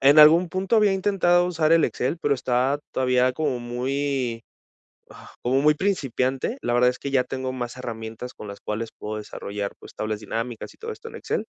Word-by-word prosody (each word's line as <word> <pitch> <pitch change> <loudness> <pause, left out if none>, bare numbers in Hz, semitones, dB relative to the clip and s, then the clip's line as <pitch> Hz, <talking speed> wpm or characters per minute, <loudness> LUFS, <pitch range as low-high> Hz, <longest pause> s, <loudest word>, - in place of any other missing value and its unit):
en 140 +3 +6
algún 165 +4 +7
punto 190 +5 0
había 210 -2 +5
intentado 185 -2 +3
usar 165 -3 +2
el 165 -1 +6
Excel, 130 +7 -1
pero 145 - +2
está 130 +2 +1
todavía 125 0 +2
como 130 -2 -1
muy, 125 0 -2 0.7
ah, - - -14
como 130 +3 +2
muy 150 +1 +5
principiante. 135 - -1
La 120 - -1
verdad 125 +1 +5
es 125 - -11
que 140 - -4
ya 130 -2 +3
tengo 130 0 -4
más 125 -1 -5
herramientas 115 0 -6
con 105 - -9
las 100 0 -8
cuales 110 +2 -4
puedo 105 0 -5
desarrollar, 100 -1 -5
pues, - - -13
tablas 110 -1 -2
dinámicas 115 +2 -4
y - - -25
todo 455 0 -6
esto 450 +1 -10
en - - -9
Excel. - - -2
130 Hz, 195 wpm, -24 LUFS, 120-160 Hz, 0.7 s, algún